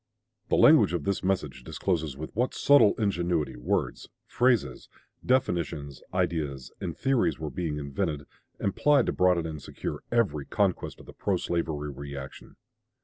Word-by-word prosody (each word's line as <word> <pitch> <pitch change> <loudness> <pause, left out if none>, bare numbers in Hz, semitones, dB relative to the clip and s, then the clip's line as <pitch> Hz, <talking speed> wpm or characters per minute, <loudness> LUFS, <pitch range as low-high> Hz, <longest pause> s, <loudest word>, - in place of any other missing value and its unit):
The - - +3
language 85 - +6
of 85 -4 -1
this 100 +3 -1
message 75 -9 -1
discloses 80 -3 -2
with 80 +2 -7
what 125 +4 0
subtle 140 -8 +5
ingenuity 90 -7 0
words, - - -2 0.2
phrases, 120 - +1 0.3
definitions, 80 - 0
ideas, 70 -6 -2
and 85 -3 -4
theories 135 -3 +1
were 80 -2 -5
being 80 -4 -3
invented 75 +1 -2 0.3
and 100 - -2
plied 145 -4 +4
to - - -1
broaden 90 -2 +3
and 80 -2 -5
secure - - -6
every 90 - +1
conquest - - -1
of - - -15
the - - -12
pro - - 0
slavery 80 -4 -2
reaction. 70 -1 -9
80 Hz, 145 wpm, -28 LUFS, 75-100 Hz, 0.3 s, language